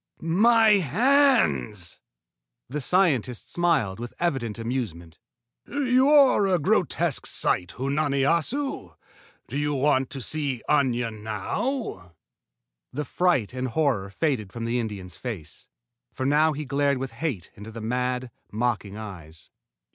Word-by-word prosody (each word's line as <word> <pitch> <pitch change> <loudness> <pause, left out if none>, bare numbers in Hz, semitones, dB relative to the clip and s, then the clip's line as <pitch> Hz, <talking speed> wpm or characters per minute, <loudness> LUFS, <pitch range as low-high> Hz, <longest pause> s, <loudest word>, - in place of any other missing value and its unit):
My 215 +5 +5
hands!" 175 - +2 0.7
The 145 +5 -4
scientist 135 - +1
smiled 155 - +1
with 120 0 -7
evident 135 -11 -1
amusement. 115 -9 -5 0.5
"You 265 -1 +2
are 275 -9 +5
a 185 -2 +3
grotesque 150 - +1
sight, 90 -1 0
Unani 140 +1 0
Assu. 195 - -1 0.5
Do 140 - -3
you 145 0 0
want 135 -1 +2
to 135 - -5
see 140 -1 -2
Aña 125 -5 +1
now?" 110 - -4 0.8
The 150 +3 -4
fright 175 - +1
and 130 0 -2
horror 125 -7 0
faded 110 - -1
from 115 +1 -5
the 120 +2 0
Indian's 100 -6 -6
face, 105 -12 -7 0.4
for 130 - -4
now 150 +3 +3
he 150 +1 -5
glared 140 +1 +1
with 130 -1 -4
hate 115 - -4
into 105 +2 -10
the 115 +1 -8
mad, 125 +2 -2 0.2
mocking 105 -3 -2
eyes. 85 -7 -10
130 Hz, 125 wpm, -25 LUFS, 110-160 Hz, 0.8 s, My